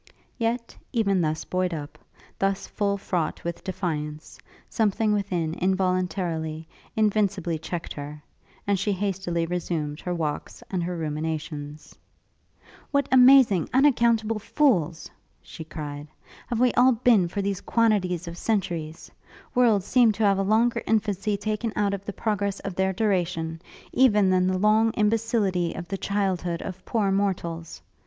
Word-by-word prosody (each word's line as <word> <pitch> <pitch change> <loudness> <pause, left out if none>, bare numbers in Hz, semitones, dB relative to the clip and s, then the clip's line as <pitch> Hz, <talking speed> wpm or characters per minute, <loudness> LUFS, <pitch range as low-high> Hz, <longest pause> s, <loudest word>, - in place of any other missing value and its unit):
Yet, 235 +1 -2 0.2
even 200 -6 +2
thus 155 -1 -1
buoyed 185 -2 -1
up, 145 -1 -8 0.4
thus 195 0 0
full 200 -1 -1
fraught 175 -4 -2
with 170 0 -5
defiance, 155 -5 -4 0.3
something 215 -1 +1
within 180 -6 -1
involuntarily, 180 -4 -1 0.3
invincibly 200 -6 +1
checked 165 +1 -5
her, 150 +1 -8 0.4
and 200 -2 +1
she 205 - 0
hastily 185 -3 -1
resumed 165 -3 -3
her 180 -1 -3
walks 155 -3 -4
and 185 -2 -1
her 175 +1 -3
ruminations. 155 -1 -4 1.0
'What 280 -1 +1
amazing, 255 - +6
unaccountable 235 -5 +3
fools,' 190 - +1 0.3
she 160 - -10
cried, 150 -2 -7 0.4
'have 235 - -2
we 250 -1 +3
all 255 +1 +5
been 225 -6 +4
for 200 +3 -3
these 200 -1 -2
quantities 195 -7 +1
of 170 +1 -7
centuries! 170 -7 -2 0.4
Worlds 225 -6 +3
seem 245 -2 +4
to 215 - -2
have 200 -1 +3
a - - +2
longer 220 +4 +2
infancy 210 -2 0
taken 215 +2 -2
out 205 -1 +1
of 200 0 -5
the 205 - -4
progress 200 -2 -1
of 195 -1 -5
their 190 +1 +1
duration, 175 -5 -1 0.3
even 210 -7 +4
than 185 0 +3
the 185 0 +1
long 215 +3 +3
imbecility 210 -5 +1
of 175 0 -6
the 195 - -2
childhood 185 -4 -1
of 185 -1 -7
poor 210 -4 +1
mortals. 175 -4 -2
190 Hz, 140 wpm, -25 LUFS, 170-215 Hz, 1.0 s, amazing